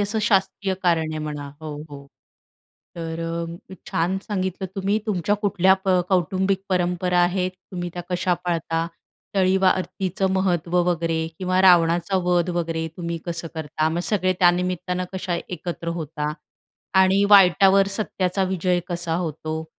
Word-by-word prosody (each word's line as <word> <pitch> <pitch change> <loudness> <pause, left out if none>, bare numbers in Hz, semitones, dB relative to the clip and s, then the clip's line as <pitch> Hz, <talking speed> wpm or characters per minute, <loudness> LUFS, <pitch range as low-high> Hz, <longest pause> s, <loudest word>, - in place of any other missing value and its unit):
असं 205 +2 -1
शास्त्रीय 195 -1 +1
कारण 165 -3 +2
आहे 155 - -3
म्हणा. 150 -1 -5
हो, 155 -1 -6 0.2
हो. 140 -1 -10 0.9
तर 165 -1 -4
अ, 170 +2 -5 0.2
छान 175 +4 0
सांगितलं 190 -2 -3
तुम्ही, 200 +2 +1
तुमच्या 205 0 +1
कुठल्या 190 -2 +4
प - - -2 0.2
कौटुंबिक 190 +1 +1
परंपरा 180 -1 +1
आहेत, 180 +1 +1 0.2
तुम्ही 175 -1 -4
त्या 175 - -4
कशा 180 0 +1
पाळता, 165 -1 -1 0.5
तळी 190 0 +3
व 190 - 0
आरतीचं 190 0 0
महत्त्व 180 -2 0
वगैरे 165 -1 -1
किंवा 185 0 +1
रावणाचा 175 0 +4
वध 180 0 +2
वगैरे 165 -2 -2
तुम्ही 170 -1 -3
कसं 170 -1 -4
करता, 155 0 -1
मग 165 +2 -1
सगळे 185 -2 +1
त्या 175 -1 +6
निमित्तानं 180 0 -2
कसे 180 -2 -2
एकत्र 170 0 -5
होतात 150 -1 -3 0.6
आणि 190 +1 +5
वाईटावर 195 0 +6
सत्याचा 195 -3 -1
विजय 185 -1 0
कसा 175 -2 -2
होतो 160 -2 -4
180 Hz, 145 wpm, -23 LUFS, 165-190 Hz, 0.9 s, त्या